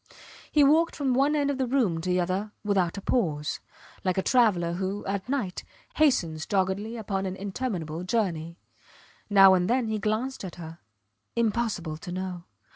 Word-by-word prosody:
He 295 Hz, -, +5 dB
walked 315 Hz, +4 st, +4 dB
from 275 Hz, -4 st, 0 dB
one 275 Hz, +4 st, +3 dB
end 285 Hz, -1 st, +1 dB
of 270 Hz, -, -4 dB
the 260 Hz, -, +1 dB
room 230 Hz, -11 st, +1 dB
to 185 Hz, -, -3 dB
the 180 Hz, 0 st, +2 dB
other 190 Hz, +4 st, -2 dB
without 195 Hz, -3 st, +1 dB
a -, -, -4 dB
pause, 155 Hz, -, 0 dB, 0.4 s
like 185 Hz, -1 st, 0 dB
a 190 Hz, -, +1 dB
traveller 200 Hz, -9 st, +3 dB
who, 190 Hz, +3 st, -3 dB
at 195 Hz, +3 st, -3 dB
night, 225 Hz, -10 st, -2 dB, 0.3 s
hastens 170 Hz, -, +2 dB
doggedly 200 Hz, +4 st, -1 dB
upon 195 Hz, -3 st, -2 dB
an 185 Hz, -, -4 dB
interminable 190 Hz, -5 st, -4 dB
journey. 175 Hz, -5 st, -1 dB, 0.7 s
Now 195 Hz, -2 st, +8 dB
and 180 Hz, -1 st, +2 dB
then 245 Hz, -2 st, +1 dB
he 215 Hz, -1 st, -1 dB
glanced 220 Hz, +6 st, -2 dB
at 185 Hz, -, -6 dB
her. 165 Hz, -1 st, -9 dB, 0.6 s
Impossible 215 Hz, -8 st, -1 dB
to 175 Hz, +3 st, -8 dB
know. 180 Hz, -1 st, -5 dB
195 Hz, 170 wpm, -27 LUFS, 180-235 Hz, 0.7 s, Now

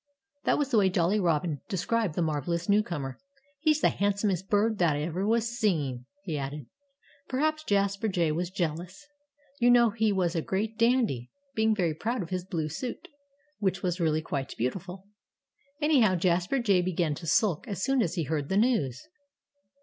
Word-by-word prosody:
That -, -, +3 dB
was 285 Hz, -2 st, -1 dB
the 225 Hz, -, +5 dB
way 195 Hz, -2 st, +4 dB
Jolly 180 Hz, +3 st, +2 dB
Robin 165 Hz, -4 st, 0 dB
described 205 Hz, -2 st, 0 dB
the 175 Hz, -, +1 dB
marvellous 165 Hz, +3 st, -2 dB
newcomer. 170 Hz, -11 st, 0 dB, 0.4 s
"He's 310 Hz, 0 st, +2 dB
the -, -, +5 dB
handsomest 200 Hz, -2 st, 0 dB
bird 215 Hz, +1 st, +2 dB
that 165 Hz, -4 st, +3 dB
ever 170 Hz, +6 st, -2 dB
was 230 Hz, +1 st, +2 dB
seen," 145 Hz, -, 0 dB, 0.2 s
he 160 Hz, -6 st, -3 dB
added. 140 Hz, 0 st, -5 dB, 0.6 s
Perhaps 310 Hz, +4 st, 0 dB
Jasper 200 Hz, +1 st, +1 dB
Jay 175 Hz, -6 st, +1 dB
was 175 Hz, +3 st, -2 dB
jealous. 180 Hz, -, -4 dB, 0.5 s
You 240 Hz, 0 st, +4 dB
know 240 Hz, -2 st, +6 dB
he 220 Hz, 0 st, +1 dB
was 180 Hz, -4 st, +1 dB
a 165 Hz, -, 0 dB
great 210 Hz, +6 st, -2 dB
dandy, 230 Hz, -, +1 dB, 0.2 s
being 220 Hz, -1 st, +2 dB
very 175 Hz, -6 st, +1 dB
proud 225 Hz, +7 st, -2 dB
of 170 Hz, -, -10 dB
his 180 Hz, -1 st, -2 dB
blue 165 Hz, -4 st, -3 dB
suit, 240 Hz, -, -6 dB, 0.5 s
which 190 Hz, -2 st, -1 dB
was 180 Hz, 0 st, -1 dB
really 155 Hz, -1 st, +1 dB
quite 140 Hz, -4 st, -4 dB
beautiful. 180 Hz, +10 st, -4 dB, 0.7 s
Anyhow, 270 Hz, -11 st, +4 dB
Jasper 180 Hz, +7 st, +1 dB
Jay 205 Hz, -7 st, +3 dB
began 175 Hz, -3 st, 0 dB
to 165 Hz, +3 st, -8 dB
sulk 160 Hz, +3 st, +2 dB
as 195 Hz, -3 st, -4 dB
soon 270 Hz, -1 st, +2 dB
as 180 Hz, -4 st, -1 dB
he 170 Hz, -, 0 dB
heard 150 Hz, -1 st, -2 dB
the 190 Hz, -, +1 dB
news. 205 Hz, -, +1 dB
185 Hz, 175 wpm, -28 LUFS, 160-220 Hz, 0.7 s, know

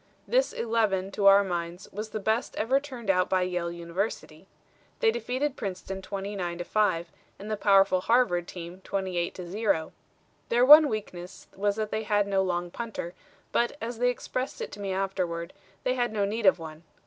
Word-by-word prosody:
This -, -, +2 dB
eleven, 215 Hz, -5 st, 0 dB
to 200 Hz, 0 st, +2 dB
our 200 Hz, +1 st, +8 dB
minds, 175 Hz, -1 st, -4 dB
was 215 Hz, +2 st, -5 dB
the 215 Hz, -, -4 dB
best 220 Hz, +4 st, -1 dB
ever 255 Hz, +6 st, +2 dB
turned 255 Hz, -8 st, -2 dB
out 185 Hz, -1 st, +1 dB
by 185 Hz, -1 st, +2 dB
Yale 180 Hz, -1 st, -2 dB
University. 170 Hz, 0 st, -4 dB, 0.5 s
They 455 Hz, -2 st, +4 dB
defeated 290 Hz, -, -2 dB
Princeton 190 Hz, -2 st, -5 dB
29 195 Hz, -3 st, -4 dB
to 175 Hz, -, -4 dB
5, 175 Hz, -5 st, 0 dB, 0.3 s
and 210 Hz, +2 st, -7 dB
the -, -, +1 dB
powerful 195 Hz, -2 st, +4 dB
Harvard 185 Hz, -7 st, +2 dB
team 175 Hz, +1 st, -8 dB
28 185 Hz, -3 st, -2 dB
to 180 Hz, -2 st, -7 dB
0. 185 Hz, -4 st, 0 dB, 0.6 s
Their 240 Hz, +2 st, +4 dB
one 300 Hz, +2 st, +10 dB
weakness 190 Hz, -4 st, -6 dB
was 205 Hz, +1 st, 0 dB
that 215 Hz, -1 st, -3 dB
they 215 Hz, -, -1 dB
had 210 Hz, -1 st, +1 dB
no 195 Hz, -1 st, +1 dB
long 175 Hz, -2 st, -2 dB
punter, 220 Hz, -7 st, -5 dB, 0.4 s
but, 240 Hz, +4 st, +1 dB
as 230 Hz, 0 st, -5 dB
they 245 Hz, 0 st, +3 dB
expressed 255 Hz, +1 st, -4 dB
it -, -, -5 dB
to 205 Hz, -, -10 dB
me 200 Hz, -1 st, -3 dB
afterward, 185 Hz, -3 st, -2 dB, 0.3 s
they 255 Hz, -, +1 dB
had 245 Hz, -2 st, 0 dB
no 205 Hz, -2 st, 0 dB
need 215 Hz, +1 st, 0 dB
of 190 Hz, -, +6 dB
one. 160 Hz, -2 st, -9 dB
200 Hz, 185 wpm, -27 LUFS, 180-225 Hz, 0.6 s, one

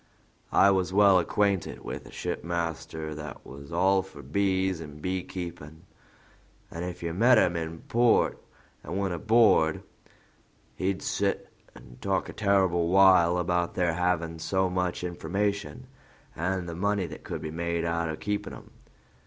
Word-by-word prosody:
I 100 Hz, -, +6 dB
was 95 Hz, -2 st, 0 dB
well 100 Hz, -1 st, +6 dB
acquainted 100 Hz, +2 st, 0 dB
with -, -, -6 dB
a -, -, -13 dB
shipmaster 80 Hz, -2 st, -4 dB
that 75 Hz, 0 st, -8 dB
was 70 Hz, +3 st, -11 dB
all 95 Hz, +3 st, +3 dB
for 95 Hz, +1 st, -12 dB
bees 95 Hz, -3 st, 0 dB
an' 75 Hz, -2 st, -9 dB
beekeepin'; 85 Hz, -3 st, -5 dB, 0.9 s
and 85 Hz, -, -5 dB
if 90 Hz, 0 st, -6 dB
you 85 Hz, -1 st, -2 dB
met 120 Hz, +7 st, +5 dB
him 90 Hz, -4 st, +3 dB
in 80 Hz, 0 st, -4 dB
port 120 Hz, 0 st, +2 dB, 0.4 s
and 85 Hz, +5 st, -4 dB
went 95 Hz, -2 st, -1 dB
aboard, 100 Hz, -5 st, +3 dB, 0.9 s
he'd 95 Hz, +1 st, -2 dB
sit -, -, -1 dB, 0.2 s
and -, -, -15 dB
talk -, -, 0 dB
a -, -, -7 dB
terrible 95 Hz, -5 st, +2 dB
while 90 Hz, -2 st, +5 dB
about 90 Hz, 0 st, 0 dB
their 90 Hz, -2 st, +1 dB
havin' 85 Hz, -2 st, -1 dB
so 95 Hz, +3 st, 0 dB
much 90 Hz, -1 st, -1 dB
information, 100 Hz, +7 st, -2 dB, 0.5 s
and 90 Hz, +1 st, -2 dB
the 85 Hz, -, -5 dB
money 100 Hz, +2 st, 0 dB
that 80 Hz, -2 st, -9 dB
could -, -, -6 dB
be 75 Hz, -, -4 dB
made 85 Hz, 0 st, -2 dB
out 85 Hz, 0 st, -1 dB
of 80 Hz, -, -5 dB
keepin' 105 Hz, 0 st, -3 dB
'em. -, -, -14 dB
90 Hz, 150 wpm, -27 LUFS, 85-95 Hz, 0.9 s, I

